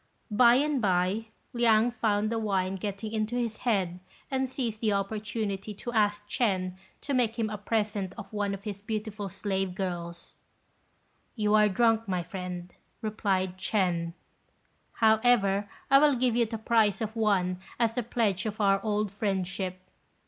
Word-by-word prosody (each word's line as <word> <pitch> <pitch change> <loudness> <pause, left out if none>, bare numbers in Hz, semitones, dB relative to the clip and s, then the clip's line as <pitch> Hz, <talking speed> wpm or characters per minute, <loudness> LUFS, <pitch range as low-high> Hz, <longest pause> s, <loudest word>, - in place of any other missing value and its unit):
By 235 +3 +6
and 285 0 +1
by, 190 +2 +1 0.3
Liang 235 -1 +4
found 215 -2 0
the 230 - 0
wine 190 -3 0
getting 205 +2 -4
into 220 +1 -1
his 230 -3 -1
head, 190 -7 0 0.3
and 265 -1 0
seized 235 -5 -3
the 215 -3 +2
opportunity 205 0 -3
to 240 +4 -6
ask 210 -1 +1
Ch'ên 185 -5 0 0.3
to 280 - -3
make 240 -3 +1
him 220 -2 -1
a 210 - -3
present 205 -3 -1
of 200 - -9
one 205 -1 -1
of 195 - -12
his 205 -2 -5
beautiful 210 -1 -4
slave 195 -1 -2
girls. 175 -3 -5 1.0
"You 210 -2 +1
are 210 -1 +6
drunk, 225 +2 +2
my 180 -2 -1
friend," 180 0 -6 0.3
replied 190 -4 -1
Ch'ên; 175 -5 0 0.8
"however, 220 -3 +3 0.2
I 275 - +9
will 290 -1 +5
give 250 -1 +1
you 235 -1 +3
the 225 +1 -4
price 220 -3 +2
of 220 0 -3
one 190 -5 +1 0.2
as 230 -1 +2
a 245 - +1
pledge 220 -4 0
of 215 +1 -5
our 195 -1 +3
old 210 -2 0
friendship." 190 -2 -2
210 Hz, 155 wpm, -28 LUFS, 195-225 Hz, 1.0 s, I